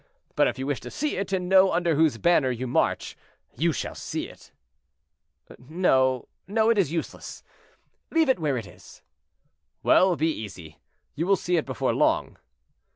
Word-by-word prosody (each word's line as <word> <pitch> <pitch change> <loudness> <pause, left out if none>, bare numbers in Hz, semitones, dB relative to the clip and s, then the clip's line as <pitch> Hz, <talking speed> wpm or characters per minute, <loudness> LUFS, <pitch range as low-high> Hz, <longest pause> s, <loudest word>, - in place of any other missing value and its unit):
But - - +4
if - - -3
you 130 - -4
wish 140 -1 -2
to - - -9
see 300 0 -2
it, 195 -1 -4
and 185 -2 -1
know 190 0 +5
under 175 -2 +1
whose 155 -5 +2
banner 170 -2 +3
you 125 0 -3
march, 120 - -1 0.4
you 170 +2 +1
shall 145 - -4
see - - -5
it." - - -17 1.1
"No, 130 -3 +1 0.2
no, 220 +3 +2
it 220 - +2
is 175 -7 +1
useless; 165 -1 -6 0.7
leave 325 -2 +2
it 260 - +2
where 145 -5 0
it 115 - -5
is." - - -16 0.8
"Well, 185 -1 +4
be 160 +1 +1
easy, 90 - -9 0.3
you 165 +4 -3
will 195 - +5
see 180 -1 -1
it 160 - 0
before 130 -4 -1
long." - - 0
165 Hz, 170 wpm, -25 LUFS, 130-190 Hz, 1.1 s, know